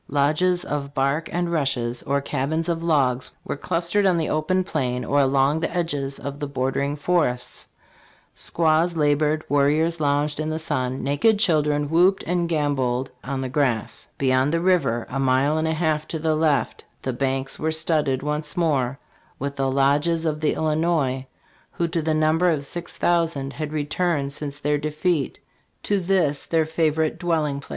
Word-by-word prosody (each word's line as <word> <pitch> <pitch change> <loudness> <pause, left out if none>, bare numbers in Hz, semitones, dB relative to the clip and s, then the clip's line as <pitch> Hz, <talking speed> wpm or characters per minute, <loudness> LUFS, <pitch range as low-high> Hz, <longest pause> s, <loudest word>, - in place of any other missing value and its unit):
Lodges 155 +6 +2
of 140 -1 -4
bark 140 +4 0
and 175 0 -1
rushes, 130 -6 -1
or 140 0 0
cabins 150 +4 -2
of 165 -1 -1
logs, 130 -6 +1 0.2
were - - -3
clustered 175 +6 0
on 185 -3 +3
the 160 - -1
open 185 +5 +1
plain 125 -8 -2
or 145 - +2
along 135 +2 +3
the 165 - -1
edges 145 -6 -2
of 140 0 -6
the 145 - -3
bordering 140 +1 -1
forests 145 -5 -1 0.7
Squaws 165 +1 +1
labored, 150 0 +2
warriors 150 +4 +2
lounged 145 0 0
in 155 0 -1
the 155 - -2
sun, 130 -5 -2
naked 145 +11 +3
children 150 -6 +2
whooped 180 +5 +3
and 175 -1 -1
gamboled 135 -5 0
on 135 0 -3
the 130 - -2
grass 130 -5 -1
Beyond 130 +1 +2
the 165 - +1
river, 170 -10 +1
a 135 - -4
mile 135 +3 +2
and 160 - 0
a 160 - +1
half 155 -2 0
to 160 - -3
the 160 0 0
left, 155 -3 0 0.2
the 130 - -2
banks 135 +1 -2
were 160 +1 0
studded 155 -4 +1
once 150 +3 -3
more 140 -6 +1 0.4
with 140 +1 -4
the 135 -1 0
lodges 145 +5 +2
of 155 -1 -1
the 155 - +1
Illinois, 155 -4 0 0.5
who 170 - -1
to 165 0 -1
the 155 0 0
number 155 +3 +3
of 150 -4 0
six 175 +4 -6
thousand 165 -5 0
had 155 -1 -5
returned 150 -1 -1
since 145 -1 -5
their 150 0 0
defeat 155 0 -1 0.4
to 205 -1 +1
this 175 -6 0
their 165 -1 +2
favorite 160 -1 0
dwelling 155 -5 0
place. 140 - -14
150 Hz, 170 wpm, -23 LUFS, 140-165 Hz, 0.7 s, on